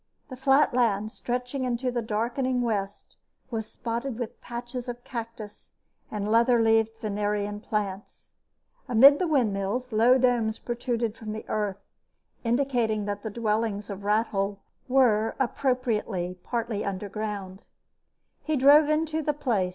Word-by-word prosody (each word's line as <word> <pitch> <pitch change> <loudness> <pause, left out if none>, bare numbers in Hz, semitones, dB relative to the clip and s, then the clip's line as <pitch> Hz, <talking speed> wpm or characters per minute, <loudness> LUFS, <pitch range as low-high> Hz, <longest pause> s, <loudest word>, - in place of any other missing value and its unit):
The - - -5
flat 270 +2 +3
land, 215 -4 +1
stretching 250 +3 -3
into 250 0 -1
the 240 -1 -1
darkening 240 +4 -1
west, 205 -4 -3 0.3
was 220 -2 -3
spotted 235 +1 -4
with 240 -3 -6
patches 240 +1 -6
of 245 0 -6
cactus 230 -3 -8 0.4
and 210 -1 -3
leather 235 +2 +4
leaved 225 0 +3
Venerian 205 0 -2
plants. 205 -2 -5 0.6
Amid 270 +5 +8
the 365 - +1
windmills, 245 -3 0
low 230 +4 +5
domes 240 -4 +2
protruded 240 -2 -2
from 215 -2 -6
the 220 - -7
earth, 205 -2 -2 0.6
indicating 235 -4 +1
that 205 0 -3
the 220 - -4
dwellings 215 -1 -1
of 200 0 -7
Rathole 205 -1 0 0.3
were, 235 -4 +3
appropriately, 230 -8 -1
partly 230 -2 -2
underground. 200 0 -5 0.8
He 310 - 0
drove 290 +3 +6
into 310 +1 0
the 300 0 0
place. 230 -10 0
230 Hz, 130 wpm, -27 LUFS, 210-250 Hz, 0.8 s, Amid